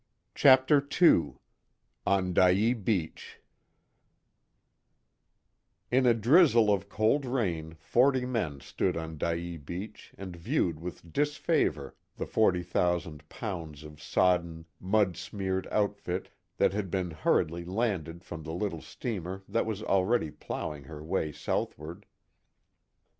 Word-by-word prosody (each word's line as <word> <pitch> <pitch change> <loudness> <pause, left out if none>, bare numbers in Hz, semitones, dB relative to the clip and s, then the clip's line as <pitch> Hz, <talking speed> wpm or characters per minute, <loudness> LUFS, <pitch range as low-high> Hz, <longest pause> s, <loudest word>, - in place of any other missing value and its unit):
CHAPTER 135 +1 +5 0.2
II 170 - +5 0.7
ON 95 -2 +2
DYEA 95 +7 +4
BEACH 100 -7 -3 2.5
In 130 +1 +4
a 120 - +5
drizzle 115 - +5
of 100 0 -3
cold 110 +8 +2
rain 90 -12 -2
forty 130 - +2
men 90 - -2
stood - - -1
on 80 -2 -6
Dyea 85 +1 -2
beach 90 +9 -8
and 95 -2 -7
viewed 85 -1 -1
with 85 -1 -9
disfavor 145 - 0 0.2
the - - -3
forty 95 -5 +2
thousand 85 -3 -1
pounds 80 - -6
of 75 -1 -12
sodden, 85 -3 +1
mud 95 -2 +1
smeared 95 0 -3
outfit 100 -3 -2 0.3
that - - +3
had 100 -2 -2
been 90 -1 -2
hurriedly 80 +2 0
landed 90 -4 -2
from 85 -2 -8
the 80 +1 -6
little 90 -3 -3
steamer 95 -5 -5
that 115 - 0
was 110 -1 -3
already 95 -3 +1
plowing 75 -1 -6
her 75 +2 -9
way 80 -2 -1
southward. 85 +6 -4
95 Hz, 120 wpm, -29 LUFS, 85-110 Hz, 2.5 s, CHAPTER